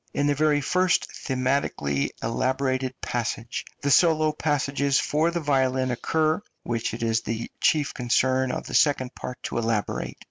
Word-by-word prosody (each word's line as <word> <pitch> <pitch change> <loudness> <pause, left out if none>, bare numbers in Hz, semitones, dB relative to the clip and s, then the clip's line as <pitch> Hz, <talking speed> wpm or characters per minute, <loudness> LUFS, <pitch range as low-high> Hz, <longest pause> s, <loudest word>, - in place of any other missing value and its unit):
In 145 - +1
the 145 - +3
very 150 0 +2
first 180 +4 +2 0.2
thematically 130 - 0
elaborated 130 +2 -1
passage 120 -1 -3 0.2
the 140 - +1
solo 155 -1 +4
passages 140 -2 +1
for 155 +3 +1
the 170 0 -2
violin 130 -4 +1
occur, 155 +7 0 0.2
which 115 -2 -2
it 115 - -5
is 115 0 +1
the 115 0 -4
chief 150 -3 +2
concern 130 +1 +1
of - - -4
the - - -8
second 130 -4 +2
part 125 - -7
to - - -2
elaborate. 115 -2 -2
130 Hz, 150 wpm, -25 LUFS, 120-150 Hz, 0.2 s, solo